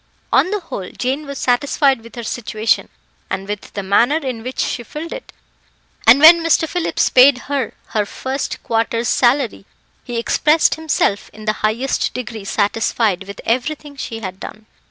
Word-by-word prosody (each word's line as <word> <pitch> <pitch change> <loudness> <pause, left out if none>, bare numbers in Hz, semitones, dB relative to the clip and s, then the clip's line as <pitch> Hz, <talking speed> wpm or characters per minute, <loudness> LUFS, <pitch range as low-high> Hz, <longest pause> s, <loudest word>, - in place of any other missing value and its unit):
On 365 - +4
the 415 0 -2
whole, 195 - -6
Jane 270 +4 -3
was 280 -1 -6
satisfied 265 +1 +2
with 230 +2 -14
her 235 - -6
situation, 220 -1 -1 0.4
and 190 +1 -4
with 205 -1 -6
the 200 - -4
manner 220 +9 +3
in 260 -7 -4
which 255 +3 -7
she - - -1
filled 300 +8 -7
it, - - -9 0.8
and 240 +5 +8
when 335 +3 +9
Mr. 330 0 +3
Phillips 355 +1 0
paid 260 +1 +7
her 275 -4 -3
her 210 -2 -1
first 265 +5 -4
quarter's 230 +1 0
salary, 250 -3 +2 0.4
he 240 -1 -5
expressed 300 +7 +3
himself 305 -10 -1
in 215 0 -11
the 215 - +1
highest 230 +5 0
degree 225 -4 -6
satisfied 205 -1 0
with 200 - -8
everything 285 +5 -2
she 225 -4 -6
had 190 -2 -6
done. 215 +2 -9
245 Hz, 165 wpm, -18 LUFS, 215-285 Hz, 0.8 s, when